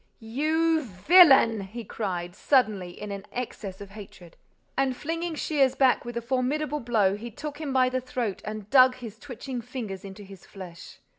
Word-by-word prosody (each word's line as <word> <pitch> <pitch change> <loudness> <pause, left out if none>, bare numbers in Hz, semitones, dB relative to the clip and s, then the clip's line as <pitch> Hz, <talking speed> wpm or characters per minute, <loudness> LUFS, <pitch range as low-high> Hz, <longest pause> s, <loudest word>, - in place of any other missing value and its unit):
"You 315 +8 +1
villain!" 260 - +6
he 215 +5 -7
cried, 180 -5 -4
suddenly, 210 -11 +1
in 210 -1 -6
an 200 0 -7
access 205 -6 -6
of 200 -1 -10
hatred. 195 -4 -12 0.4
And, 265 -2 0
flinging 330 +1 -3
Shears 280 -4 +1
back 260 -3 +3
with 240 0 -5
a 235 - -3
formidable 270 +4 -1
blow, 220 -6 +1
he 230 +3 -7
took 295 +6 -7
him 295 -3 -3
by 260 -1 +3
the 255 0 -1
throat 245 -5 -3
and 215 -1 -6
dug 255 -1 +7
his 230 -4 -10
twitching 255 -2 -6
fingers 225 -6 -6
into 200 +1 -10
his 195 -2 -13
flesh. 185 -3 -11
240 Hz, 170 wpm, -26 LUFS, 200-270 Hz, 0.4 s, dug